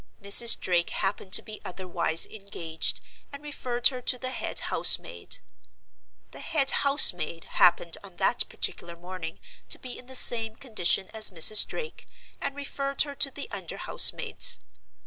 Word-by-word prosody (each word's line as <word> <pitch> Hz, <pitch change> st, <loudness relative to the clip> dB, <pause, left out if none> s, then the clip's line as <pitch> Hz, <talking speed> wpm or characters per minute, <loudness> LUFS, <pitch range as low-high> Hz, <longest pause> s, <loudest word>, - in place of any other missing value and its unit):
Mrs. 215 Hz, +4 st, +5 dB
Drake 175 Hz, -2 st, -1 dB
happened 195 Hz, 0 st, -4 dB
to -, -, +5 dB
be 215 Hz, -1 st, -10 dB
otherwise 175 Hz, -3 st, -1 dB
engaged, 175 Hz, -6 st, -3 dB, 0.3 s
and 280 Hz, +1 st, -11 dB
referred 250 Hz, -5 st, -1 dB
her 255 Hz, -2 st, -8 dB
to 250 Hz, -, -2 dB
the 255 Hz, +1 st, -6 dB
head -, -, -5 dB
house -, -, +4 dB
maid. -, -, -7 dB, 0.9 s
The -, -, -12 dB
head 275 Hz, -4 st, +1 dB
house 280 Hz, -5 st, +6 dB
maid 165 Hz, -1 st, -7 dB
happened 170 Hz, -1 st, +1 dB
on 190 Hz, -3 st, -14 dB
that 200 Hz, +6 st, 0 dB
particular 170 Hz, 0 st, -6 dB
morning 175 Hz, -1 st, -9 dB, 0.3 s
to -, -, +3 dB
be 250 Hz, -1 st, -10 dB
in 250 Hz, -, -16 dB
the 260 Hz, -, -8 dB
same 225 Hz, -3 st, +3 dB
condition 205 Hz, -7 st, -2 dB
as 220 Hz, -1 st, +8 dB
Mrs. 195 Hz, +4 st, +4 dB
Drake, 465 Hz, -1 st, -9 dB, 0.3 s
and 280 Hz, 0 st, -4 dB
referred 275 Hz, -1 st, -2 dB
her 285 Hz, -2 st, -9 dB
to 280 Hz, -, +1 dB
the 280 Hz, +1 st, -8 dB
under -, -, -7 dB
house -, -, +4 dB
maids. -, -, +2 dB
220 Hz, 165 wpm, -25 LUFS, 180-265 Hz, 0.9 s, as